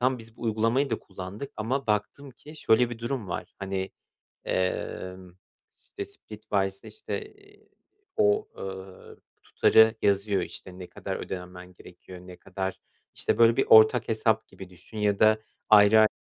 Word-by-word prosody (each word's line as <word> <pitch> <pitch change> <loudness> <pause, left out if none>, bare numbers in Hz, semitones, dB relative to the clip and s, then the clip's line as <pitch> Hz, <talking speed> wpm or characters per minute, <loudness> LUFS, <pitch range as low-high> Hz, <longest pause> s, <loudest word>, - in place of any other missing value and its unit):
Tamam, 130 0 +1
biz 115 0 -14
bu - - -13
uygulamayı 115 +4 +1
da 115 - -1
kullandık 100 +9 -8
ama 130 +5 -2
baktım 110 +6 -2
ki 150 +6 -14
şöyle 120 -3 +3
bir 115 - -7
durum 120 -4 -4
var, - - -6
hani, 95 -1 -3 0.6
emm, 90 0 -3 0.6
Splitwise'da, 100 -3 -4
işte, 435 +1 -5
eee, 410 0 -23 0.5
o, 420 0 +3
ııı, 95 -1 -9 0.3
tutarı 110 0 +4
yazıyor, 100 0 +1
işte, 95 0 -8
ne 90 - -8
kadar - - -6
ödemen 90 0 -8
gerekiyor, 90 +1 -13
ne 90 0 -12
kadar, 95 0 -5 0.4
işte, - - 0
böyle, 115 0 +5
bir - - +3
ortak 110 +2 +7
hesap 110 0 +1
gibi 95 -1 -12
düşün 90 +4 -14
ya 105 -1 +1
da 110 0 +5 0.3
ayrı 105 +1 +7
a 110 - +6
110 Hz, 150 wpm, -27 LUFS, 95-115 Hz, 0.6 s, ortak